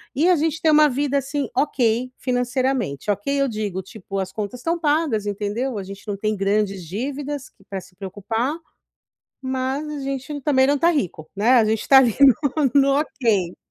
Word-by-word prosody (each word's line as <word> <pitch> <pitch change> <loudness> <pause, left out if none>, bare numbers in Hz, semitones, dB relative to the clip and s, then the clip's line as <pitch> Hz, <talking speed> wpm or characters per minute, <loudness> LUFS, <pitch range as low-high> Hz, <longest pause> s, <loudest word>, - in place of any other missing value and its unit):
E 315 +7 +3
a 360 - +6
gente 320 +1 -1
tem 315 - +4
uma 300 0 +6
vida, 280 +1 0
assim, 280 0 -2
OK, 250 -3 +1
financeiramente. 245 - -1
OK, 205 +6 -3
eu 275 - +2
digo, 210 -5 -3
tipo, 195 0 -7
as 185 -1 -3
contas 215 +4 -5
estão 335 +5 -1
pagas, 295 -9 +1
entendeu. 210 +4 -2
A 195 - -5
gente 195 +2 -11
não 205 - -2
tem 215 +1 -1
grandes 195 -2 0
dívidas 270 - -4
que - - -26
pra 195 -1 -4
se 180 - -18
preocupar, 210 - -3 0.9
mas 260 +3 -2
a 295 -1 -5
gente 275 +2 -4
também 265 -1 +3
não 290 0 +2
tá 335 - +4
rico, 185 - -2
né. 210 +5 +1
A 235 -3 +5
gente 220 0 -1
tá 270 - +8
ali 245 -5 +5
no 280 0 +4
no 275 +1 +3
OK. 210 - -1
250 Hz, 190 wpm, -22 LUFS, 205-280 Hz, 0.9 s, tá